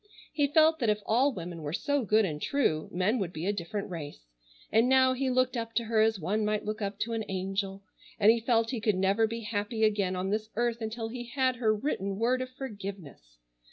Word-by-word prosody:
He 290 Hz, -2 st, +2 dB
felt 315 Hz, +2 st, +4 dB
that 235 Hz, -5 st, +1 dB
if 210 Hz, 0 st, 0 dB
all 255 Hz, +6 st, +3 dB
women 175 Hz, -6 st, -7 dB
were 150 Hz, 0 st, -4 dB
so 285 Hz, -, 0 dB
good 215 Hz, 0 st, +3 dB
and 150 Hz, -4 st, -4 dB
true 200 Hz, -, 0 dB
men 190 Hz, +7 st, +1 dB
would 185 Hz, -4 st, -2 dB
be 160 Hz, 0 st, -5 dB
a 205 Hz, -, +1 dB
different 200 Hz, +2 st, -4 dB
race, 145 Hz, -, -7 dB, 0.5 s
and 225 Hz, +3 st, +4 dB
now 260 Hz, 0 st, +5 dB
he 260 Hz, +1 st, -1 dB
looked 255 Hz, 0 st, +2 dB
up 230 Hz, -1 st, -4 dB
to 235 Hz, -, +2 dB
her 225 Hz, -1 st, +2 dB
as 220 Hz, -2 st, +2 dB
one 205 Hz, +6 st, -1 dB
might 210 Hz, 0 st, -1 dB
look 215 Hz, +1 st, -3 dB
up 200 Hz, 0 st, -3 dB
to 230 Hz, -, -1 dB
an 225 Hz, -1 st, -1 dB
angel, 195 Hz, +1 st, -3 dB, 0.4 s
and 210 Hz, +2 st, +7 dB
he 230 Hz, -, +1 dB
felt 230 Hz, 0 st, +1 dB
he 240 Hz, -4 st, -3 dB
could 210 Hz, -2 st, +2 dB
never 195 Hz, +4 st, +2 dB
be 230 Hz, +1 st, -5 dB
happy 215 Hz, +1 st, -2 dB
again 205 Hz, -4 st, +2 dB
on 185 Hz, +1 st, -2 dB
this 215 Hz, +1 st, -2 dB
earth 235 Hz, 0 st, 0 dB
until 225 Hz, +1 st, -4 dB
he 240 Hz, +1 st, -6 dB
had 255 Hz, 0 st, 0 dB
her 225 Hz, -2 st, +2 dB
written 200 Hz, -5 st, -2 dB
word 245 Hz, +4 st, +1 dB
of 255 Hz, -, -4 dB
forgiveness. 195 Hz, -, -8 dB
220 Hz, 225 wpm, -29 LUFS, 195-240 Hz, 0.5 s, and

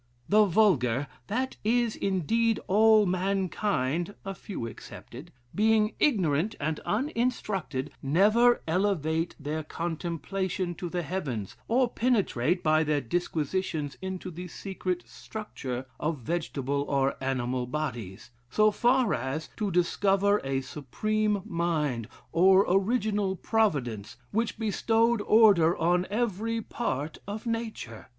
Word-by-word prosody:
The 215 Hz, +1 st, +5 dB
vulgar 145 Hz, -, +3 dB, 0.2 s
that 255 Hz, +5 st, -2 dB
is, 235 Hz, +1 st, +1 dB
indeed, 220 Hz, +5 st, +1 dB
all 215 Hz, +1 st, +5 dB
mankind, 185 Hz, -3 st, -1 dB
a 195 Hz, -, -3 dB
few 190 Hz, -, -6 dB
excepted 125 Hz, +6 st, -10 dB, 0.2 s
being 215 Hz, 0 st, +3 dB
ignorant 195 Hz, -, +2 dB
and 155 Hz, +1 st, -2 dB
uninstructed, 215 Hz, -, -1 dB
never 210 Hz, -, +4 dB
elevate 165 Hz, -2 st, 0 dB
their 150 Hz, +2 st, -3 dB
contemplation 175 Hz, +3 st, -3 dB
to 175 Hz, 0 st, -6 dB
the 175 Hz, 0 st, -2 dB
heavens, 135 Hz, -, -4 dB
or 250 Hz, +2 st, +3 dB
penetrate 195 Hz, -, +1 dB
by 155 Hz, 0 st, +4 dB
their 150 Hz, -1 st, +1 dB
disquisitions 155 Hz, +1 st, -2 dB
into 190 Hz, -1 st, -5 dB
the 180 Hz, +2 st, -7 dB
secret 185 Hz, 0 st, -4 dB
structure 135 Hz, -, -6 dB
of 155 Hz, 0 st, -1 dB
vegetable 140 Hz, -1 st, -2 dB
or 135 Hz, -1 st, +1 dB
animal 125 Hz, -1 st, -1 dB
bodies; 120 Hz, -8 st, -5 dB, 0.2 s
so 215 Hz, -, +4 dB
far 245 Hz, +1 st, +2 dB
as, 130 Hz, +6 st, -3 dB
to 210 Hz, -2 st, -1 dB
discover 195 Hz, +3 st, +2 dB
a 135 Hz, 0 st, -1 dB
Supreme 205 Hz, +10 st, -1 dB
Mind 155 Hz, -, -1 dB, 0.2 s
or 190 Hz, +3 st, +5 dB
Original 200 Hz, 0 st, +1 dB
Providence, 135 Hz, -, -1 dB
which 225 Hz, +2 st, -1 dB
bestowed 225 Hz, +1 st, +2 dB
order 205 Hz, -7 st, +5 dB
on 175 Hz, +2 st, +2 dB
every 225 Hz, +1 st, -1 dB
part 155 Hz, -, -3 dB
of 210 Hz, +3 st, -5 dB
nature. 225 Hz, -, -4 dB
185 Hz, 115 wpm, -28 LUFS, 150-215 Hz, 0.2 s, The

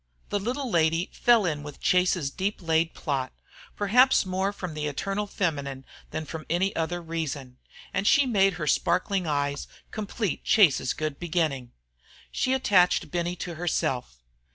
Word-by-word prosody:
The 205 Hz, -, 0 dB
little 255 Hz, +7 st, -2 dB
lady 165 Hz, -3 st, +1 dB
fell 235 Hz, -4 st, +4 dB
in 150 Hz, -4 st, -1 dB
with 145 Hz, -1 st, -9 dB
Chase's 180 Hz, -5 st, +2 dB
deep 195 Hz, +6 st, -2 dB
laid 165 Hz, -1 st, +1 dB
plot, 135 Hz, -4 st, -2 dB, 0.4 s
perhaps 245 Hz, +4 st, +4 dB
more 190 Hz, +1 st, -1 dB
from 180 Hz, -5 st, -6 dB
the 150 Hz, 0 st, -3 dB
eternal 195 Hz, +8 st, -2 dB
feminine 140 Hz, -9 st, -2 dB, 0.2 s
than 155 Hz, -, -4 dB
from 160 Hz, +1 st, -7 dB
any 185 Hz, +4 st, +1 dB
other 165 Hz, +2 st, -1 dB
reason, 145 Hz, -6 st, -5 dB, 0.3 s
and 200 Hz, -, 0 dB
she 285 Hz, -, +5 dB
made 195 Hz, -6 st, +3 dB
her 170 Hz, -3 st, -4 dB
sparkling 180 Hz, +4 st, +1 dB
eyes 145 Hz, -1 st, -1 dB, 0.2 s
complete 210 Hz, -2 st, -3 dB
Chase's 155 Hz, -, +4 dB
good 155 Hz, -2 st, -4 dB
beginning. 155 Hz, -8 st, -1 dB, 0.6 s
She 260 Hz, -, 0 dB
attached 195 Hz, -9 st, +3 dB
Benny 175 Hz, 0 st, -1 dB
to 175 Hz, -1 st, -5 dB
herself. 130 Hz, -, -2 dB
175 Hz, 150 wpm, -26 LUFS, 150-195 Hz, 0.6 s, she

